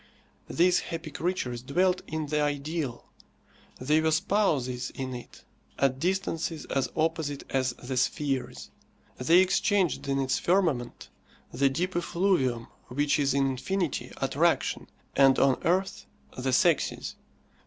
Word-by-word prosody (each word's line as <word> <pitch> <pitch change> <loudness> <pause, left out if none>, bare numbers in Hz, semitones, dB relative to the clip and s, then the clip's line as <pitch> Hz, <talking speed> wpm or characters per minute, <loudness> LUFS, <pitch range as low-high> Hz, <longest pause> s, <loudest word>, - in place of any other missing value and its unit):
These 180 +1 +3
happy 165 -2 -6
creatures 135 -7 -2
dwelt 180 +8 +1
in 155 0 -3
the 150 +1 0
ideal. 145 -2 -2 0.7
They 150 +5 +2
were 160 - +2
spouses 155 -8 0
in 130 -1 -4
it 120 - -10 0.3
at 135 -1 +1
distances 165 -2 -2
as 135 -1 0
opposite 155 -3 -1
as 130 -2 +1
the 125 +2 -6
spheres. 135 +1 -2 0.5
They 165 +8 +5
exchanged 190 -3 +1
in 135 0 0
its 135 -1 0
firmament 165 -10 0 0.4
the 135 +3 +2
deep 175 +7 -2
effluvium 170 -10 +1 0.2
which 145 +4 +1
is 140 -1 +1
in 140 -1 +3
infinity 155 +6 -2
attraction, - - 0 0.3
and 135 -1 +5
on 135 -1 +3
earth 190 +3 0 0.3
the 130 +1 -2
sexes. - - +1
145 Hz, 125 wpm, -28 LUFS, 130-175 Hz, 0.7 s, They